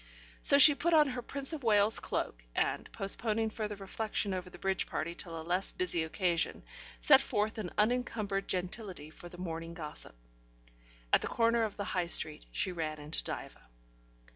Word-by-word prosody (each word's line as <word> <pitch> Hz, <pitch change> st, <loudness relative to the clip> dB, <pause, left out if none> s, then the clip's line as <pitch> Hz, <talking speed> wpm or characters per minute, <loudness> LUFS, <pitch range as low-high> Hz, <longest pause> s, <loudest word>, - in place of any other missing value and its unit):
So 280 Hz, -, +4 dB
she 290 Hz, +2 st, +10 dB
put 335 Hz, +4 st, +1 dB
on 300 Hz, -2 st, +5 dB
her 250 Hz, -1 st, -4 dB
Prince 275 Hz, +5 st, -2 dB
of 310 Hz, -, -4 dB
Wales's 215 Hz, -2 st, +4 dB
cloak, -, -, -3 dB
and, -, -, -1 dB
postponing 220 Hz, +2 st, 0 dB
further 210 Hz, -1 st, -4 dB
reflection 200 Hz, 0 st, -2 dB
over 180 Hz, 0 st, -4 dB
the -, -, -12 dB
bridge 190 Hz, 0 st, -1 dB
party 170 Hz, +2 st, -3 dB
till 170 Hz, -2 st, -7 dB
a -, -, -7 dB
less 180 Hz, +3 st, +1 dB
busy 175 Hz, -2 st, +1 dB
occasion, 170 Hz, +1 st, -1 dB, 0.4 s
set 270 Hz, -2 st, +7 dB
forth 215 Hz, -2 st, -1 dB
in 190 Hz, -5 st, -4 dB
unencumbered 210 Hz, -3 st, 0 dB
gentility 180 Hz, -3 st, -4 dB
for 175 Hz, -, -12 dB
the 175 Hz, -, -12 dB
morning 165 Hz, -1 st, -5 dB
gossip. 150 Hz, -, -6 dB, 1.0 s
At -, -, +6 dB
the -, -, -2 dB
corner 230 Hz, 0 st, +2 dB
of 220 Hz, -2 st, -2 dB
the 200 Hz, -, -2 dB
High 180 Hz, -3 st, -1 dB
Street, -, -, 0 dB
she 120 Hz, -, 0 dB
ran 160 Hz, -3 st, -3 dB
into 150 Hz, +2 st, -4 dB
Diva. -, -, -6 dB
195 Hz, 175 wpm, -32 LUFS, 170-225 Hz, 1.0 s, she